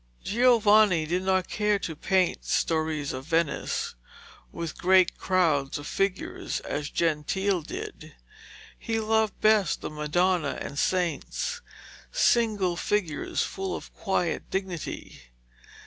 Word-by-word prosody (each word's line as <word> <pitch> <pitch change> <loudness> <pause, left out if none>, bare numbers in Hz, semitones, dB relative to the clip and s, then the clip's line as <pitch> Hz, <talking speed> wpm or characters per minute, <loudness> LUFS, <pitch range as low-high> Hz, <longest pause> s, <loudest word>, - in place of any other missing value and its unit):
Giovanni 215 -7 +4
did 175 +4 -1
not 190 -1 +1
care 210 -1 +1
to 165 -5 -5
paint 185 +3 +1
stories 155 -3 0
of 130 +2 -7
Venice, 165 -2 0 0.6
with 170 -3 -6
great 185 -1 +4
crowds 160 -7 +1
of 145 - -8
figures, 195 +2 -2
as 145 0 -4
Gentile 170 +4 0
did. 150 - -8 0.6
He 225 -1 -2
loved 220 -1 +1
best 215 -5 +3
the - - -5
Madonna 155 +1 0
and 140 - -5
saints, 185 - -1 0.5
single 220 - +2
figures 175 -4 -1
full 190 -1 -4
of - - -9
quiet 180 -4 -1
dignity. 190 -4 -5
185 Hz, 115 wpm, -27 LUFS, 160-205 Hz, 0.6 s, Giovanni